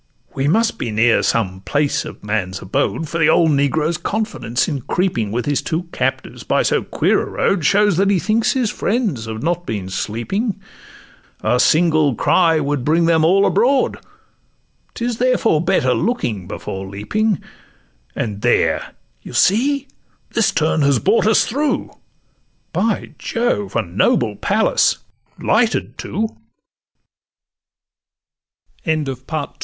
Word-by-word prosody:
'We 135 +1 -1
must 220 +8 +1
be - - -3
near 115 +2 +3
some 95 -4 -1
place 145 +6 0
of - - -10
man's 100 -3 -2
abode;— 140 +9 -1
For 165 +3 -4
the 160 - +4
old 165 -2 +4
negro's 150 +3 +1
confidence 210 - -2
in 140 -4 -3
creeping, 120 - -1
With 120 +2 -2
his 145 -1 0
two 165 +2 -2
captives, - - -3
by - - +1
so - - +1
queer - - +1
a - - -5
road, 190 -5 0
Shows 200 +3 +3
that 195 +1 +3
he 200 - +3
thinks 220 +6 +1
his 250 -5 0
friends 200 - -1
have 110 +2 -5
not 175 +2 -1
been 100 -4 -4
sleeping; 185 - -2 0.8
A 120 +3 +1
single 155 -1 +3
cry 165 +3 +3
would 145 -3 -1
bring 165 +4 +2
them 165 -1 +3
all 195 +5 +4
abroad: 250 +8 +2 1.0
'Tis 235 -1 -3
therefore 240 -10 +2
better 170 -9 +2
looking 115 - -2
before 95 +1 -6
leaping— 190 - -1 0.8
And 105 -3 -3
there, - - +1 0.3
you - - -11
see, 275 +8 +2 0.4
this 225 - +2
turn 155 0 +1
has 140 -2 +3
brought 210 - +2
us 220 - +4
through, 290 +5 -1 0.8
By - - -1
Jove, 165 - -1
a - - +2
noble 105 +4 +1
palace! - - +2
155 Hz, 130 wpm, -19 LUFS, -, 1.0 s, the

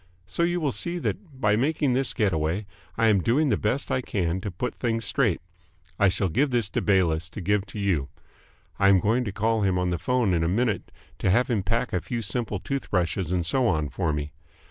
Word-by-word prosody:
So 90 - -3
you 175 +1 +2
will 150 -4 0
see 170 +7 -3
that 165 -5 -4
by 105 -4 +3
making 140 +2 +1
this 130 +1 0
getaway 90 -1 0 0.3
I 115 - +3
am 105 -4 +4
doing 135 - +2
the - - +3
best 125 +7 -1
I 130 - +1
can 95 -5 -1
to 100 - -3
put 100 +7 -3
things 115 -2 -2
straight. 120 -11 +1 0.6
I 100 - +5
shall 95 +1 0
give 135 - +1
this 120 -5 +1
to - - 0
Bayliss 85 -5 +2
to - - -8
give 100 +2 0
to - - -9
you. 90 -9 0 0.7
I 100 -1 +5
am 95 -1 +6
going 115 +6 +1
to 100 - -3
call 110 +2 0
him 95 -2 +2
up 90 - +1
on 90 - 0
the 85 - -1
phone 125 -5 +1
in 85 -1 +1
a - - +1
minute 105 +1 0 0.3
to - - +1
have 125 +6 +3
him 110 -4 +1
pack 115 +6 -1
a 90 - +1
few 120 -2 -4
simple 105 0 -2
tooth 135 +6 -4
brushes 90 -1 0
and 90 -2 0
so 125 +8 +3
on 75 -7 0
for 80 +5 -1
me. 75 0 -3
105 Hz, 235 wpm, -26 LUFS, 90-125 Hz, 0.7 s, am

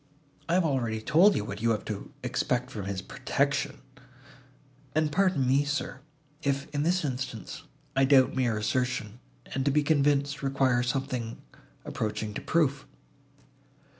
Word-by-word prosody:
I 170 - +3
have 185 -2 +3
already 120 -7 0
told 165 - +5
you 105 - -1
what 100 0 -6
you 115 - +2
have 110 -2 0
to 105 -2 -5
expect 125 +1 -1
from 105 -6 -5
his 95 -1 -3
protection." 140 +3 -1 1.1
"And 155 -1 +2
pardon 180 -4 +2
me, 135 +3 +4
sir, 145 -2 -3 0.4
if, 140 -1 -1
in 145 - 0
this 175 +2 +1
instance, 125 -6 -5 0.3
I 135 0 +4
doubt 130 -2 +5
mere 120 -4 +1
assertion, 115 0 -1 0.3
and, 135 - 0
to 140 - +2
be 150 +1 +3
convinced, 145 -1 +2
require 135 -3 +2
something 125 -2 -2 0.5
approaching 105 0 -3
to - - -5
proof." 145 -4 +1
135 Hz, 145 wpm, -28 LUFS, 115-145 Hz, 1.1 s, told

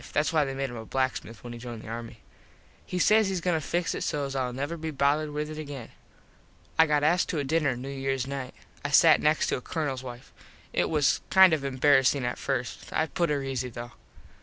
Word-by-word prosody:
Thats 150 +3 +1
why 155 -2 +3
they 135 -1 -4
made 135 -1 -2
him 120 - -7
a 110 - -6
blacksmith 130 -4 -2
when 120 -1 -7
he 120 - -8
joined 120 -2 -8
the - - -11
army. 115 0 -7 0.7
He 180 - -3
says 215 +3 +4
hes 190 -2 -1
goin 175 +1 0
to 160 - 0
fix 175 +4 -1
it - - -4
sos 140 -2 -2
Ill 130 -2 -1
never 140 +6 -3
be 160 -1 -5
bothered 145 +1 +1
with 150 +1 -4
it 155 - -6
again. 140 -5 -7 0.9
I 160 - +7
got 150 -1 +2
asked 175 +4 +3
to 165 - -1
a 145 - 0
dinner 145 -2 +1
New 125 +3 -7
Years 135 -1 -2
night. 135 -2 -5 0.3
I 145 - -2
sat 155 +2 +6
next 150 +1 +3
to - - 0
a - - -8
Colonels 135 -3 -3
wife. 125 -1 -10 0.4
It - - +1
was 150 -3 +2
kind 190 -3 +7
of 150 -3 0
embarassing 135 0 +3
at 120 - -3
first. 130 -3 -3
I 160 - +1
put 170 +1 -1
her 145 -2 0
easy 130 -2 -3
though. 120 +1 -8
140 Hz, 230 wpm, -27 LUFS, 130-155 Hz, 0.9 s, I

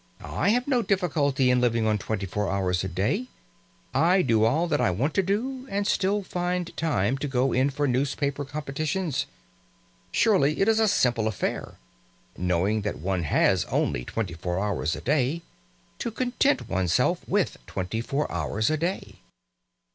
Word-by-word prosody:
I - - 0
have 245 +4 +2
no 255 -4 +2
difficulty 150 - +1
in 125 0 +3
living 115 -2 +2
on 105 -1 +2
twenty 100 0 -3
four 105 +2 -2
hours 95 -2 0
a - - -2
day. 95 +7 -1 0.7
I 175 +7 +4
do 110 -3 +3
all 155 +9 +2
that 150 -3 +1
I - - +3
want 125 - 0
to 195 - +3
do, 255 +8 -2
and 200 +1 -1
still 200 +1 +1
find 180 -1 -2
time 135 -6 0
to 145 - -2
go 130 -1 +1
in 130 +3 +3
for 145 +1 -1
newspaper 140 +2 0
competitions. 150 +3 -2 0.8
Surely 180 -10 +3
it 195 - +3
is 225 0 +4
a 220 - +4
simple 120 - +2
affair, 110 -4 -3 0.6
knowing 90 +4 +1
that 105 0 -3
one 90 +2 -2
has - - +3
only - - 0
twenty 95 - -3
four 90 +2 -3
hours 95 -5 -1
a - - -7
day, 145 +4 0 0.6
to - - -2
content 255 +4 0
one's 95 -2 0
self - - +2
with - - +1
twenty 95 +5 -3
four 140 +5 -1
hours 95 - 0
a 155 - +1
day!" 175 +5 -3
135 Hz, 170 wpm, -26 LUFS, -, 0.8 s, I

